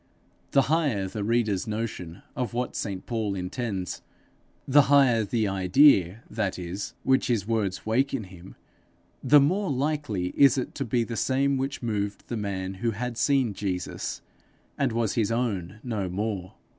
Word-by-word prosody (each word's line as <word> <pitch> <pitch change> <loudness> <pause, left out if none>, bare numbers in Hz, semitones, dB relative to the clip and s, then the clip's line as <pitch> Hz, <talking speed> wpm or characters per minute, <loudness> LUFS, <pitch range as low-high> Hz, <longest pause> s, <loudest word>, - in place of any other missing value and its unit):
The 135 - +4
higher 140 -11 +1
the 105 +2 -4
reader's 110 -2 +1
notion 105 -6 -5
of 120 -3 -3
what 125 0 -2
St 100 -4 -4
Paul 110 -4 -2
intends 95 0 -4 0.7
the 145 +2 +7
higher 135 -6 +5
the 110 +1 0
idea, 95 - +4
that 105 -4 -2
is, 90 +3 -5
which 130 0 +2
his 110 -5 0
words 105 -5 -1
wake 130 +6 +1
in 130 -5 -2
him, 95 -1 -13 0.7
the 150 - +7
more 185 +8 +1
likely 135 -9 -1
is 140 -2 +6
it 130 - -3
to - - -3
be 120 +1 +1
the 115 0 -5
same 135 +3 +1
which 135 0 -3
moved 105 -3 -3
the 120 - -2
man 95 -3 -3
who 120 - +1
had 120 +3 -3
seen 130 -2 +2
Jesus, 95 -2 -4 0.5
and 135 -3 0
was 115 -2 0
his 115 -2 +1
own 110 -5 -2
no 105 -6 -2
more. 95 -1 -3
110 Hz, 160 wpm, -26 LUFS, 95-130 Hz, 0.7 s, the